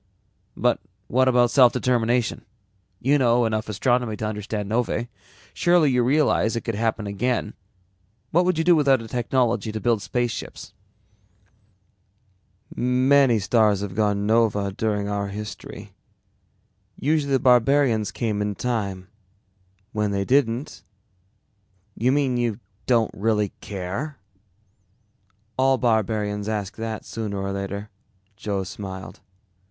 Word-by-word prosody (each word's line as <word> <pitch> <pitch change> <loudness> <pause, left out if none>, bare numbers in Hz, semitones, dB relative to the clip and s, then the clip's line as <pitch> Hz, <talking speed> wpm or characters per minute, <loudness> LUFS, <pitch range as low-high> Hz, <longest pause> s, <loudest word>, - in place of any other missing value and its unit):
"But - - +2 0.3
what 130 +2 +3
about 120 -2 +4
self 125 -4 +6
determination? 120 -1 0 0.6
You 140 +3 +2
know 120 -1 +3
enough 110 -1 -2
astronomy 120 +1 0
to 110 - -3
understand 105 -1 -4
novae. 120 +1 -1 0.4
Surely 175 -5 +3
you 125 -1 +2
realize 130 -4 +2
it 115 - -2
could 115 - -3
happen 110 0 -1
again. 105 +2 -1 0.8
What 175 +3 +4
would 180 -2 +1
you 160 - +1
do 175 +1 +5
without 135 -5 +3
a - - -9
technology 120 -1 0
to 110 - -4
build 115 -2 +1
spaceships?" 120 +2 -4 2.0
"Many 130 0 +3
stars 105 0 +2
have 100 -2 -4
gone 105 0 0
nova 105 -3 +2
during 105 0 -1
our 100 0 -2
history. 105 +1 -8 1.1
Usually 145 -1 +1
the 135 - +4
barbarians 125 -3 +3
came 110 -4 -2
in 105 -1 -2
time. 100 -6 -3 0.9
When 105 -1 0
they 100 -1 -1
didn't 130 0 0 0.6
" 100 -1 -43
"You 125 - +4
mean 135 -3 +1
you 120 -3 -1 0.3
don't 115 -3 +3
really 105 0 0
care?" 100 +10 -5 1.4
"All 135 0 +4
barbarians 110 -3 0
ask 105 -2 -3
that 110 -1 -5
sooner 105 -3 -4
or 100 0 -3
later," 100 +1 -5 0.4
Joe 100 -1 -3
smiled. 95 0 -8
115 Hz, 125 wpm, -23 LUFS, 105-125 Hz, 2.0 s, self